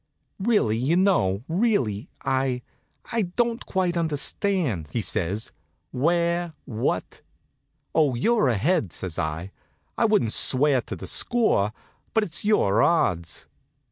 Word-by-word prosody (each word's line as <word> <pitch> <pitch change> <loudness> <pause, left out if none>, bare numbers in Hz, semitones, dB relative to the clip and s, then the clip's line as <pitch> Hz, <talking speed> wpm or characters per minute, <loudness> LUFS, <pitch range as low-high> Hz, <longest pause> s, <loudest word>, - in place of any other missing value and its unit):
"Really, 195 - +2
you 140 +9 +1
know, 120 - +2
really 165 - 0 0.2
I 130 -2 0 0.5
I 230 -1 +1
don't 230 +5 -1
quite 185 -2 0
understand," 160 - 0
he 120 - 0
says. 105 +5 -1 0.4
"Where 170 +4 0
what 115 -3 -3 0.4
" - - -49
"Oh, 150 -5 +2
you're 220 - +2
ahead," 120 - +1
says 90 -4 -5
I. 80 +4 -3 0.5
"I - - +4
wouldn't 210 - +2
swear 135 0 +4
to - - -7
the - - -8
score; 220 - +2 0.4
but 220 - +4
it's 170 -5 -1
your 160 - +3
odds." 85 - +1
145 Hz, 125 wpm, -24 LUFS, -, 0.5 s, I